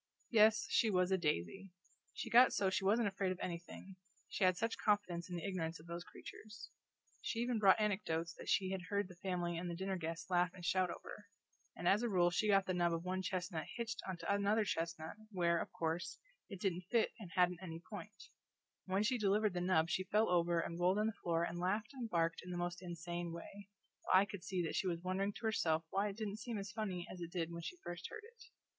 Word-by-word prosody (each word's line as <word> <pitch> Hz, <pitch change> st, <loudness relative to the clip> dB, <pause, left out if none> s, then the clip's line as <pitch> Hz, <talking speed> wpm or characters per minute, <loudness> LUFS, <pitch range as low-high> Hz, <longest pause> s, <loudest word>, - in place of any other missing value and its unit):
Yes, 220 Hz, -1 st, +6 dB
she 225 Hz, -, +4 dB
was 180 Hz, -2 st, +2 dB
a 190 Hz, -, +4 dB
daisy! 170 Hz, -, -1 dB, 0.4 s
She -, -, -6 dB
got 245 Hz, +2 st, +8 dB
so 190 Hz, -2 st, +2 dB
she 195 Hz, -, 0 dB
wasn't 215 Hz, +3 st, +3 dB
afraid 195 Hz, -1 st, 0 dB
of 185 Hz, -, -4 dB
anything, 180 Hz, +2 st, -6 dB, 0.3 s
she 195 Hz, -, -2 dB
had 185 Hz, -1 st, +4 dB
such 225 Hz, +3 st, -1 dB
confidence 185 Hz, -5 st, +1 dB
in 180 Hz, -, -4 dB
the 170 Hz, -, -4 dB
ignorance 165 Hz, -4 st, -2 dB
of 155 Hz, -, -14 dB
those 170 Hz, 0 st, -5 dB
creatures. 215 Hz, +3 st, -11 dB, 0.5 s
She -, -, -3 dB
even 240 Hz, -1 st, +1 dB
brought 195 Hz, +1 st, +6 dB
anecdotes 170 Hz, -6 st, 0 dB
that -, -, -9 dB
she 190 Hz, -1 st, +2 dB
had 190 Hz, -1 st, -2 dB
heard 200 Hz, -1 st, 0 dB
the 180 Hz, -, -12 dB
family 175 Hz, -2 st, -2 dB
and 175 Hz, 0 st, -3 dB
the 170 Hz, -, -3 dB
dinner 190 Hz, +1 st, -2 dB
guests 165 Hz, +1 st, -5 dB
laugh 180 Hz, 0 st, +2 dB
and 180 Hz, -2 st, -8 dB
shout 185 Hz, 0 st, +2 dB
over; 205 Hz, +4 st, -8 dB, 0.5 s
and 175 Hz, -, -3 dB
as 200 Hz, +4 st, +5 dB
a 240 Hz, -, 0 dB
rule 175 Hz, -3 st, +4 dB
she 215 Hz, +5 st, +1 dB
got 195 Hz, -2 st, +5 dB
the 185 Hz, -, -1 dB
nub 175 Hz, -1 st, +2 dB
of 165 Hz, 0 st, -2 dB
one 185 Hz, +1 st, -1 dB
chestnut 180 Hz, -3 st, -3 dB
hitched 235 Hz, 0 st, -3 dB
onto 185 Hz, -2 st, -5 dB
another 200 Hz, +2 st, +2 dB
chestnut, 165 Hz, 0 st, -3 dB
where, 170 Hz, -3 st, +2 dB
of -, -, -6 dB
course, 170 Hz, +1 st, -2 dB, 0.3 s
it 195 Hz, -4 st, -7 dB
didn't 180 Hz, -2 st, -1 dB
fit 230 Hz, -1 st, +3 dB
and 190 Hz, -4 st, -9 dB
hadn't 180 Hz, -1 st, +3 dB
any 165 Hz, -3 st, -6 dB
point; 205 Hz, +3 st, -10 dB, 0.6 s
and 185 Hz, -, -4 dB
when 200 Hz, -, +3 dB
she 245 Hz, +3 st, +1 dB
delivered 210 Hz, 0 st, +3 dB
the 175 Hz, -, -1 dB
nub 175 Hz, -3 st, +3 dB
she 185 Hz, -, +1 dB
fell 215 Hz, +2 st, +3 dB
over 170 Hz, -1 st, +3 dB
and 170 Hz, +1 st, -3 dB
rolled 180 Hz, +3 st, +3 dB
on 210 Hz, -, +2 dB
the 220 Hz, -, 0 dB
floor 170 Hz, -1 st, +1 dB
and 170 Hz, 0 st, -2 dB
laughed 210 Hz, +7 st, -1 dB
and 245 Hz, -4 st, -5 dB
barked 165 Hz, -3 st, +1 dB
in 180 Hz, -, -9 dB
the 175 Hz, -, -3 dB
most 175 Hz, +1 st, -2 dB
insane 175 Hz, -1 st, -4 dB
way, 195 Hz, +4 st, -9 dB, 0.3 s
while 185 Hz, -, +5 dB
I 195 Hz, -, +4 dB
could 200 Hz, -3 st, -8 dB
see 185 Hz, -2 st, -1 dB
that 165 Hz, -, -2 dB
she 190 Hz, -, +1 dB
was 170 Hz, -1 st, -2 dB
wondering 195 Hz, +2 st, 0 dB
to 230 Hz, -, -7 dB
herself 165 Hz, -7 st, +1 dB
why 200 Hz, +2 st, +1 dB
it 200 Hz, 0 st, -5 dB
didn't 215 Hz, -1 st, -3 dB
seem 230 Hz, 0 st, -4 dB
as 195 Hz, -1 st, -5 dB
funny 190 Hz, -5 st, -3 dB
as 180 Hz, -, -8 dB
it 170 Hz, -, -4 dB
did 170 Hz, -2 st, -2 dB
when 170 Hz, 0 st, -5 dB
she 360 Hz, -, -6 dB
first 175 Hz, -1 st, -5 dB
heard 440 Hz, -, -8 dB
it. 455 Hz, 0 st, -15 dB
185 Hz, 235 wpm, -37 LUFS, 170-205 Hz, 0.6 s, got